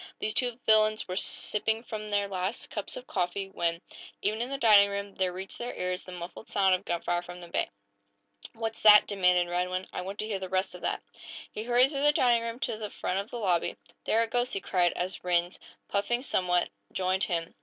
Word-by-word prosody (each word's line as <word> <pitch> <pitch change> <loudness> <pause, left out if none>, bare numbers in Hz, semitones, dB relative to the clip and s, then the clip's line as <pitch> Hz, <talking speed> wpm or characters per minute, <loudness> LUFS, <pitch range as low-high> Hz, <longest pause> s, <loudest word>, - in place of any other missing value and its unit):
These 215 - -2
two 245 0 +1
villains 215 0 +4
were 180 - -4
just - - +2
sipping 220 +2 0
from 215 -2 -6
their 205 -1 +1
last 190 +3 -3
cups 210 -2 -3
of 250 - -8
coffee 195 0 -2
when, 170 -3 -1 0.4
even 215 +2 0
in 245 - -2
the 275 - -3
dining 210 -5 +6
room, 200 0 -4
there 185 -1 0
reached 190 +2 -6
their 240 +1 -4
ears 180 0 -2
the 185 - -9
muffled 175 +4 -8
sound 190 -1 +3
of 185 - -1
gunfire 175 0 -1
from 175 0 -10
the 175 - -10
bay. 170 - -1 0.8
"What's 225 -1 -4
that?" 210 -1 +8
demanded 180 -3 +3
Radwin. 180 +1 -1
"I - - -3
want 195 +2 -6
to 215 - -2
hear 205 -3 -2
the 190 -1 -6
rest 185 0 0
of 180 - -10
that!" - - -2 0.5
He - - -5
hurried 245 +3 +5
through 275 -2 -2
the 295 +1 +5
dining 240 -4 +3
room 230 0 -4
to 215 - -1
the 210 -1 -4
front 190 -1 -2
of 200 +3 -5
the 245 - -6
lobby. 180 -7 0 0.3
"There 225 +1 +3
it 225 - -5
goes," 245 +1 0
he - - -1
cried, 175 -2 +1
as 180 +1 -4
Rhinds, 175 0 0 0.3
puffing 240 +5 0
somewhat, 180 -8 +1 0.2
joined 185 +1 +1
him. 170 -2 -2
200 Hz, 220 wpm, -28 LUFS, 180-220 Hz, 0.8 s, that